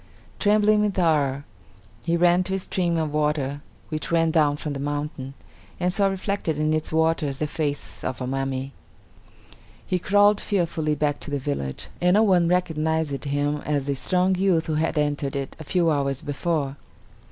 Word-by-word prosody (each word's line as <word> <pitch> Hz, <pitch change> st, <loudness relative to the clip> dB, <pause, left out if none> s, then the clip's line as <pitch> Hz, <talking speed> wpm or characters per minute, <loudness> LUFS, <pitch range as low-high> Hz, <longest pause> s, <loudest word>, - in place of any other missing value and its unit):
Trembling 210 Hz, 0 st, +4 dB
with 210 Hz, -2 st, 0 dB
horror, 145 Hz, -5 st, +1 dB, 0.6 s
he 170 Hz, 0 st, +1 dB
ran 175 Hz, +1 st, +4 dB
to 190 Hz, -, -1 dB
a -, -, +1 dB
stream 175 Hz, -2 st, -1 dB
of 155 Hz, -2 st, -1 dB
water 150 Hz, -2 st, 0 dB, 0.3 s
which 155 Hz, 0 st, -4 dB
ran 165 Hz, -1 st, +3 dB
down 150 Hz, -3 st, +3 dB
from 150 Hz, -1 st, -4 dB
the 140 Hz, -, -5 dB
mountain, 145 Hz, -2 st, -4 dB, 0.4 s
and 180 Hz, 0 st, +1 dB
saw 200 Hz, 0 st, +2 dB
reflected 195 Hz, -4 st, -2 dB
in 155 Hz, +1 st, +1 dB
its 155 Hz, 0 st, -1 dB
waters 160 Hz, -3 st, +1 dB
the 155 Hz, -, -1 dB
face 150 Hz, -1 st, -3 dB
of 130 Hz, -, -3 dB
a 130 Hz, -, -3 dB
mummy. 135 Hz, +1 st, -3 dB, 1.1 s
He 180 Hz, -, 0 dB
crawled 205 Hz, +3 st, +4 dB
fearfully 165 Hz, -6 st, 0 dB
back 145 Hz, 0 st, 0 dB
to -, -, -7 dB
the 145 Hz, -, -1 dB
village, 130 Hz, -, -4 dB
and 180 Hz, +2 st, +4 dB
no 215 Hz, -, +5 dB
one 180 Hz, -5 st, +4 dB
recognized 160 Hz, -4 st, 0 dB
him 145 Hz, +1 st, 0 dB
as 145 Hz, -2 st, -2 dB
the 140 Hz, -, 0 dB
strong 180 Hz, +6 st, +1 dB
youth 185 Hz, -3 st, +2 dB
who 160 Hz, -, -2 dB
had 155 Hz, +1 st, 0 dB
entered 145 Hz, -1 st, 0 dB
it 135 Hz, -1 st, -4 dB
a -, -, -6 dB
few 170 Hz, +1 st, +1 dB
hours 140 Hz, -2 st, -1 dB
before. 145 Hz, -1 st, -2 dB
155 Hz, 175 wpm, -24 LUFS, 145-180 Hz, 1.1 s, no